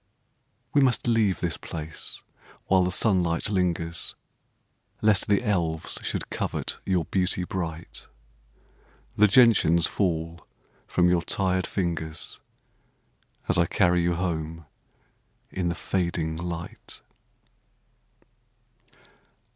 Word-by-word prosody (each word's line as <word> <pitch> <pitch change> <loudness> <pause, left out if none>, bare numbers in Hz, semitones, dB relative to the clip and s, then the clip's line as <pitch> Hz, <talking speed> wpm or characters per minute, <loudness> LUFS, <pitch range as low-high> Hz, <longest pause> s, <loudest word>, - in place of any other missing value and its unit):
We 145 - +5
must 130 -3 +2
leave 115 -5 +2
this 85 -4 0
place 80 -1 -7 0.4
while 95 -1 +4
the 90 - 0
sunlight 90 -2 +2
lingers 85 -4 0 0.9
Lest 105 -3 +4
the 100 +3 +2
elves 85 -7 0
should - - -3
covet - - -3
your 90 -4 +1
beauty 90 +1 0
bright. 85 -3 -5 1.1
The 105 - +6
gentians 100 -7 +5
fall 85 -3 -2 0.4
from 90 0 +3
your 90 -1 +3
tired 95 0 0
fingers 80 -4 -3 1.1
As 90 - +2
I 85 - +3
carry 90 -1 +3
you 85 0 +1
home 80 -2 -3 0.9
in 90 -2 -1
the 85 - -2
fading 85 -4 -1
light. 85 0 -6
90 Hz, 100 wpm, -26 LUFS, 85-95 Hz, 1.1 s, The